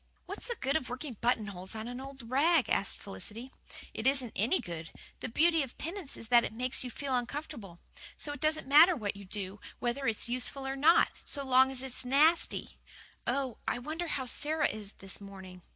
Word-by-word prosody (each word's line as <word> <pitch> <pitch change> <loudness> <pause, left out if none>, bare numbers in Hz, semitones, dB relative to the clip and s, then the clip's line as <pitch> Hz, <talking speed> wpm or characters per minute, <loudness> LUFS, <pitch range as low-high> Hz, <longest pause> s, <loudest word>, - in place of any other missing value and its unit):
"What's - - -6
the 475 - -2
good 270 +2 0
of 275 -5 0
working 255 +2 -5
buttonholes 210 -5 -1
on 220 +1 -5
an 245 +1 -5
old 270 -3 -9
rag?" 290 +4 +3
asked 195 - +2
Felicity. 215 +6 -7 0.4
"It 230 - -1
isn't 265 -4 +2
any 230 - +2
good. 165 -2 -6 0.3
The - - -4
beauty 325 +6 +4
of 265 -3 -5
penance 335 -2 -5
is 225 - -10
that 240 -1 +7
it - - -3
makes 250 +3 -1
you 250 - -4
feel 270 +2 -2
uncomfortable. 245 - -4 0.4
So 290 - 0
it 290 - -8
doesn't 310 +1 +1
matter 320 +6 +8
what 210 -8 -3
you 200 0 -10
do, 195 +1 -5 0.2
whether 245 +3 -1
it's 225 0 +1
useful 255 +3 -3
or 270 0 -2
not, 315 +5 +5
so 280 -1 0
long 260 0 +6
as 265 -1 -2
it's 260 -1 -5
nasty. 295 +7 +2 0.5
Oh, 265 -4 -1
I - - +1
wonder 310 +7 -4
how 270 -4 -2
Sara 300 +4 +1
is 210 -1 -6
this 195 +1 -8
morning." 190 -2 -10
255 Hz, 200 wpm, -32 LUFS, 220-290 Hz, 0.5 s, matter